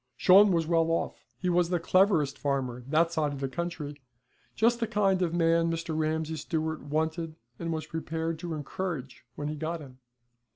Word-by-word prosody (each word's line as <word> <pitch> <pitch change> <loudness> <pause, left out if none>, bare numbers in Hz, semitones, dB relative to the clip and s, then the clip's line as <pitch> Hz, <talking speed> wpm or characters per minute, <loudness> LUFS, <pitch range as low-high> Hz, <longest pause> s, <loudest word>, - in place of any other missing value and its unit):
Shawn 195 +2 +7
was 165 -2 +2
well 165 0 +2
off. 165 - -1
He 185 - -3
was 175 -1 +3
the 175 -1 +1
cleverest 165 -5 +3
farmer 130 -3 -2
that 160 +3 +3
side 150 -3 0
of 140 - -6
the 135 - -1
country, 150 -1 -5 0.5
just 235 +2 +3
the 230 - 0
kind 200 -4 +2
of 175 -2 +1
man 165 0 +3
Mr. 165 -1 -3
Ramsay 160 0 -1
Stewart 160 +1 -2
wanted 160 +2 -2 0.2
and 165 0 -3
was 160 -1 -3
prepared 160 0 -3
to 170 -2 -4
encourage 150 -3 -5
when 145 - -4
he 150 - -2
got 160 +3 -3
him. 130 -4 -12
165 Hz, 180 wpm, -29 LUFS, 150-170 Hz, 0.5 s, Shawn